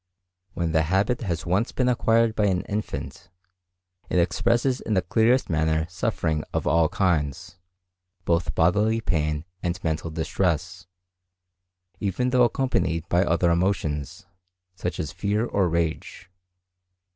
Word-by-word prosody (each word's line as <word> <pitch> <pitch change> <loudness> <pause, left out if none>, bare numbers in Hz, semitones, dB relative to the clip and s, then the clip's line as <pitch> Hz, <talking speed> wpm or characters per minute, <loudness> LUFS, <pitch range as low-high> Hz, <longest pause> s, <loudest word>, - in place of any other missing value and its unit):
When 85 -2 -1
the 80 0 +3
habit 95 +9 +1
has 85 -7 -3
once 95 +7 0
been 125 - 0
acquired 115 -2 +3
by 105 -2 +1
an 90 -2 0
infant, 105 0 -5 0.8
it - - 0
expresses 120 +9 +1
in 110 - -1
the 95 - +2
clearest 115 +7 +2
manner 80 -1 +1
suffering 80 -2 -1
of - - -1
all 80 -1 +3
kinds, 85 -3 -1 0.7
both 85 0 0
bodily 105 +7 +2
pain 75 -7 -1 0.2
and 90 +1 -2
mental 80 0 -2
distress, 80 +1 -2 1.1
even 115 +6 -1
though 125 -1 +5
accompanied 95 - -1
by 90 +2 +3
other 85 -1 +2
emotions, 85 -4 -1 0.5
such 90 -2 -4
as 75 -2 -3
fear 100 +7 -1
or 100 -6 +1
rage. 85 +2 -3
90 Hz, 130 wpm, -25 LUFS, 80-105 Hz, 1.1 s, though